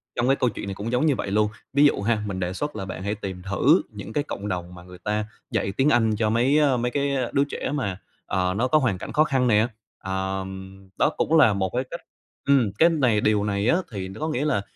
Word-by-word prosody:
trong 120 +1 0
cái 135 - +4
câu 125 - +1
chuyện 105 - -6
này 100 - -4
cũng 105 +4 -4
giống 125 +5 +2
như 150 -4 +3
vậy 100 - -4
luôn, 105 +1 +2 0.2
ví 140 +2 +5
dụ 145 - +3
ha, 105 0 0
mình 95 -2 -4
đề 90 0 -2
xuất 145 +10 -4
là 95 -3 -4
bạn 95 -1 -6
hãy 100 +2 -1
tìm 95 -3 -6
thử 125 - +3
những 105 0 -9
cái 145 - 0
cộng 105 -8 -6
đồng 90 -2 -4
mà 85 - -12
người 90 0 -12
ta 105 0 -1 0.3
dạy 95 - 0
tiếng 135 +6 +2
Anh 115 -5 +3
cho 110 0 +1
mấy, 120 +6 +3
ơ, 140 -4 +3
mấy 120 +1 -1
cái 140 +1 0 0.2
đứa 140 - +4
trẻ 145 - -4
mà, 100 -10 -2 0.3
ờ, 90 0 0
nó 125 +4 +2
có 140 - +4
hoàn 120 -9 0
cảnh 90 - -7
khó 155 - +5
khăn 135 -4 +1
nè, 110 0 +4 0.4
ờm, 95 0 -5
đó - - +4
cũng 160 - +2
là 110 -9 +6
một 95 -1 -1
cái 125 - +1
cách 170 - -6 0.5
ừm, 135 -7 +4
cái 165 - +7
này 130 -10 +2
điều 105 -1 +2
này 100 0 -1
á 170 - +4 0.2
thì 95 -2 -4
có 155 - -2
nghĩa 145 -1 -1
là 100 -10 +1
110 Hz, 260 wpm, -24 LUFS, 95-135 Hz, 0.5 s, cái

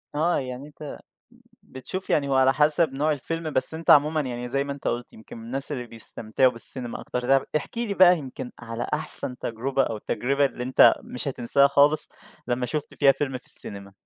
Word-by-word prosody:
آه 165 +4 +1
يعني 130 +2 -7
أنت 150 0 -10 0.6
بتشوف 160 +9 -8
يعني 140 -2 +1
هو 135 - 0
على 130 0 +4
حسب 150 0 +3
نوع 150 +3 0
الفيلم 160 +3 -4
بس 130 +4 +2
أنت 165 0 -1
عمومًا 150 +2 +5
يعني 125 -3 -5
زي 140 +3 -1
ما 140 - -4
أنت 140 - -5
قُلت 120 +1 -4
يمكن 110 - -13
من 115 - -11
الناس 135 +5 -5
اللي 125 -4 -5
بيستمتعوا 115 +2 -1
بالسينما 120 +1 0
أكتر 125 - -4 0.2
طيب، - - -12
احكِ 155 +9 -5
لي 230 -4 -2
بقى 180 -2 +6
يمكن 130 -3 -8
على 115 0 -5
أحسن 140 -4 +3
تجربة 130 +4 -2
أو 115 - -3
التجربة 140 +6 -1
اللي 125 -2 -3
أنت 130 +1 +5
مش 125 - -6
هتنساها 140 +2 +2
خالص 145 +2 +3 0.4
لمّا 125 0 -1
شُفت 150 +1 -5
فيها 140 -2 +4
فيلم 135 -1 -3
في - - -24
السينما؟ 100 -1 -1
135 Hz, 195 wpm, -24 LUFS, 125-150 Hz, 0.6 s, بقى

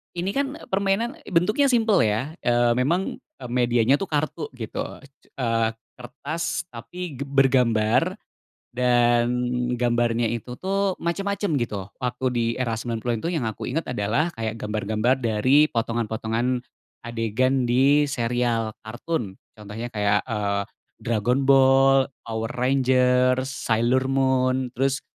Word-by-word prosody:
Ini 180 +3 -2
kan 280 +2 -2
permainan, 200 +6 0
bentuknya 210 +10 +2
simpel 225 -5 +3
ya. 110 +9 -1
Eee, 120 0 +3
memang 165 +10 0 0.2
eee, - - -7
medianya 120 +1 +2
tuh 190 +4 -5
kartu 155 +2 -2
gitu. 120 -4 -5 0.2
E 140 - -16
c 135 - -41 0.3
eee, 115 -2 +1 0.2
kertas 145 +6 -4
tapi 175 +5 -8
ge 135 - -4
bergambar 130 - +2 0.5
dan 120 -1 +3 0.5
gambarnya 120 -1 +1
itu 120 +2 -5
tuh 195 0 0
macem-macem 195 -1 -1
gitu. 105 -6 -3
Waktu 125 0 -3
di 120 - +1 0.2
era 115 -3 -1
90-an 115 0 -2
itu - - +1
yang 150 -8 -1
aku 110 - -7
inget 165 +3 -2
adalah 120 +7 0
kayak 110 -1 -2
gambar-gambar 110 +4 0
dari 130 +5 +3
potongan-potongan 115 0 -1 0.4
adegan 120 +3 0
di 135 +5 +4
serial 120 -4 -1
kartun. 120 - -4 0.2
Contohnya 105 +3 -7
kayak, 105 -3 +1
eee, 100 -2 -1 0.4
Dragon 120 +4 0
Ball, 135 0 +5 0.2
Power 115 0 -4
Rangers, 130 0 +2
Sailor 120 +1 +1
Moon, 130 -1 +1
terus 135 +1 +1
125 Hz, 125 wpm, -24 LUFS, 115-140 Hz, 0.5 s, Ball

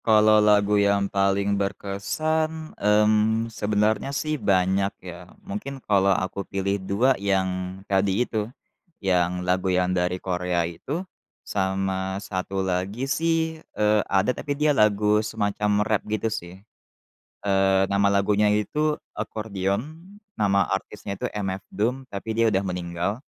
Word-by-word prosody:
Kalau 110 -1 +6
lagu 105 -1 +4
yang 100 0 +2
paling 100 +1 +2
berkesan, 155 +12 -2
mmm, 110 +2 +2
sebenarnya 105 +4 0
sih 155 +2 -2 0.2
banyak 95 +1 +3
ya, 90 0 -10 0.2
mungkin 195 -9 -5
kalau 100 -6 +2
aku 95 +1 0
pilih 100 0 -2
2 105 +8 +2
yang 95 -2 -1
tadi 95 +4 +1
itu, 110 -2 -3 0.5
yang 90 -2 0
lagu 90 +1 +1
yang 90 0 +1
dari 90 0 0
Korea 90 -2 -1
itu. 140 - -5 0.4
Sama 95 -1 -1
1 95 -1 -3
lagi 95 +7 -2
sih, 160 +2 0 0.2
eee, 105 0 +3
ada, 100 +6 +2
tapi 145 +1 -4
dia 150 0 +3
lagu 105 -2 +3
semacam 105 -1 0
rap 110 -2 +1
gitu, 110 +1 -1
sih. 90 -2 -7 0.9
Eee, 95 -1 +3
nama 100 0 +3
lagunya 100 +1 +3
itu 150 +9 +1 0.2
Accordion, 105 +4 -3 0.5
nama 100 -1 +3
artisnya 100 0 -4
itu - - -1
MF 95 -2 -2
Doom, 125 +7 -2
tapi 100 +2 -5
dia 115 +1 +3
udah 100 -2 +1
meninggal. 90 +3 -3
100 Hz, 130 wpm, -24 LUFS, 95-110 Hz, 0.9 s, Kalau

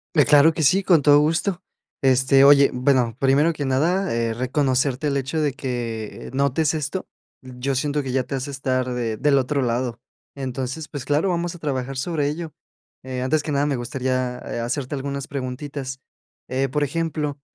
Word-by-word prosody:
Eh, 150 - +5
claro 150 +2 +6
que 165 - -3
sí, 190 +8 +4
con 170 -5 +4
todo 145 +1 +6
gusto. 170 +4 0 0.4
Este, 135 +1 +4
oye, 140 0 +7
bueno, 125 -3 +2
primero 140 +5 +3
que 145 - -4
nada, 170 +8 +1
eh, 115 -1 0
reconocerte 130 +2 0
el 140 - 0
hecho 140 +4 -2
de 145 -3 0
que 120 -6 -5
notes 140 +3 +1
esto, 155 +5 -3 0.3
yo 130 +1 -4
siento 145 +2 -1
que 130 - -4
ya 130 0 +1
te 135 - -5
hace 135 +2 -4
estar 130 -2 -1
de 115 -3 -2
del 145 +3 +2
otro 135 +2 0
lado. 120 -1 -2 0.3
Entonces, 135 +3 -4
pues, 145 -5 -6
claro, 150 +6 +1
vamos 175 0 -2
a 175 - -12
trabajar 135 -3 -3
sobre 150 +1 -1
ello. 155 +2 -4 0.5
Eh, 130 -1 -4
antes 145 +4 +1
que 150 - -4
nada, 140 +1 +2
me 140 -3 0
gustaría, 125 0 -2
eh, 120 - -5
hacerte 130 +4 -3
algunas 140 0 -4
preguntitas. 135 0 -5 0.5
Eh, 135 +1 0
por 145 +3 -1
ejemplo, 150 -1 -2
140 Hz, 180 wpm, -22 LUFS, 130-150 Hz, 0.5 s, oye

